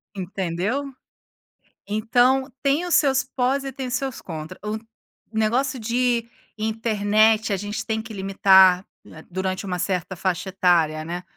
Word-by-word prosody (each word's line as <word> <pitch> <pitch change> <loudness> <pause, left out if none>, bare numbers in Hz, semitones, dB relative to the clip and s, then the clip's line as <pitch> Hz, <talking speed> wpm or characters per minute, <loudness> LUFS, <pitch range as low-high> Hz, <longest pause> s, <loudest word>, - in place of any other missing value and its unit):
Entendeu? 195 +9 -3 0.9
Então, 245 +6 +2
tem 280 +5 +2
os 350 - +2
seus 265 -3 +3
pós 265 +1 -1
e 270 - -4
tem 265 -1 -5
os 245 - -4
seus 265 -1 -3
contra, 160 -3 -7
o 210 +1 -2 0.6
negócio 245 +5 +1
de 235 +1 0 0.3
internet 215 0 +2
a 200 - +1
gente 205 +2 -4
tem 220 0 -1
que 220 0 -10
limitar 190 -1 +5 0.4
durante 185 +2 -3
uma 180 -2 -3
certa 180 0 -2
faixa 185 +1 -2
etária, 170 -5 +2
né, 175 +3 -5
215 Hz, 135 wpm, -23 LUFS, 190-250 Hz, 0.9 s, limitar